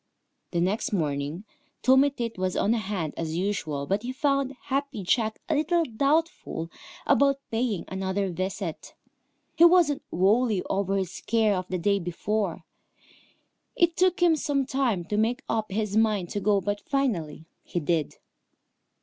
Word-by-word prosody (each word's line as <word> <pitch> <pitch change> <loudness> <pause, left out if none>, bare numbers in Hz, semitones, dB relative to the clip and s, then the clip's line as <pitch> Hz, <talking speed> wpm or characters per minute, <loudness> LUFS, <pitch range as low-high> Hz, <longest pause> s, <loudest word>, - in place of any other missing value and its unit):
The 170 - -1
next 195 +5 0
morning 150 0 -1 0.4
Tommy 265 +3 +6
Tit 235 -4 -4
was 185 -1 -1
on 215 - +2
hand 195 -8 -2
as 160 -1 -3
usual, 160 -7 -2
but 195 +6 0
he 245 +2 -4
found 275 -1 0
Happy 275 -5 -2
Jack 220 +3 +1
a 320 - +1
little 325 +3 +2
doubtful 275 - -1 0.3
about 275 -1 +4
paying 225 -4 -1
another 190 0 -2
visit. 185 -1 -4 0.6
He 335 - +5
wasn't 340 -5 +5
wholly 205 +2 +2
over 195 0 -1
his 190 -3 -2
scare 220 -2 +1
of 185 -1 -3
the 185 - -2
day 200 +3 +1
before. 185 +1 -2 1.1
It 340 -1 +3
took 370 0 +2
him 335 -2 +5
some 280 -2 0
time 255 -10 0
to 210 +4 -2
make 240 +6 +1
up 220 -2 -1
his 210 0 -1
mind 215 -5 +2
to 205 - -2
go, 200 0 +2
but 205 +2 -2
finally 180 - -2 0.2
he 175 - -3
did. 160 -1 -1
210 Hz, 150 wpm, -26 LUFS, 185-270 Hz, 1.1 s, Tommy